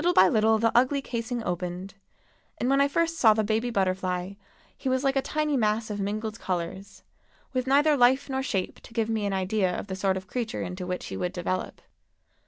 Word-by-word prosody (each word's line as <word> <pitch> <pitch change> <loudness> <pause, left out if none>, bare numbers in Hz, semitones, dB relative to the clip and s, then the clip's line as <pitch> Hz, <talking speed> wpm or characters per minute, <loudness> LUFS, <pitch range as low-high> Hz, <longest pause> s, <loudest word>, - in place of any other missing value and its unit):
Little 350 +2 +2
by 185 - +7
little 220 0 +3
the 230 +1 +2
ugly 260 +4 +4
casing 235 -1 -3
opened, 180 +1 -4 0.6
and 245 - -1
when 275 0 +4
I 280 - +5
first 330 +3 0
saw 220 -3 +6
the 220 - +1
baby 220 +3 0
butterfly 185 -2 -1 0.4
he 265 - -3
was 260 +1 +1
like 270 0 +2
a 270 - +3
tiny 305 +1 -1
mass 220 -2 +1
of 205 - -4
mingled 215 +2 -3
colors, 185 +2 -4 0.5
with 255 0 -1
neither 290 +3 +4
life 260 +1 +4
nor 265 -1 -1
shape 195 -8 -2
to - - -15
give 225 -1 0
me 215 -2 0
an 200 - -1
idea 190 -1 0
of - - -5
the 190 -2 -5
sort 190 0 0
of 190 - -7
creature 235 +1 -3
into 180 +1 -5
which 180 0 -3
he - - -5
would 180 0 -2
develop. 185 +1 -3
220 Hz, 210 wpm, -27 LUFS, 190-255 Hz, 0.6 s, by